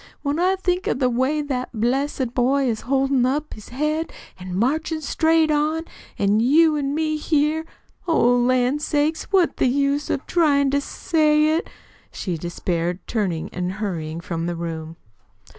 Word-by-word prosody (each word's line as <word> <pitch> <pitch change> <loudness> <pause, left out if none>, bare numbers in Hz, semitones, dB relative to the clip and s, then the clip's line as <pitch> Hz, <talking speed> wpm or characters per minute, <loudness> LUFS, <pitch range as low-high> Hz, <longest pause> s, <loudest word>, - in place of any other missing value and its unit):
"When 290 +2 -1
I 370 +2 +3
think 365 -1 -1
of - - 0
the 255 -2 +1
way 265 +5 0
that 260 -3 -3
blessed 260 +1 0
boy 265 +2 +2
is 225 -3 -1
holdin' 270 0 +1
up 285 +4 -1
his 215 - -12
head 305 +5 -2 0.3
an' 180 0 -6
marchin' 310 - 0
straight 320 +1 +2
on; 305 +2 +1 0.3
an' 200 +2 +2
you 305 +7 +4
an' 285 -1 -1
me 310 0 0
here 305 +1 0 0.4
oh, 245 -7 +4
lan' 250 +3 +2
sakes, 300 +1 0
what's 375 -4 +3
the - - +2
use 280 +2 0
of 275 - -2
TRYIN' 285 -5 +2
to 285 0 +1
say 305 0 +2
it!" 330 - -3 0.4
she 180 -4 -4
despaired, 175 +1 -3
turning 185 -8 -2
and 180 0 -3
hurrying 170 -6 -4
from 170 -2 -4
the 175 - -2
room. 165 -1 -5
275 Hz, 160 wpm, -22 LUFS, 215-305 Hz, 0.4 s, you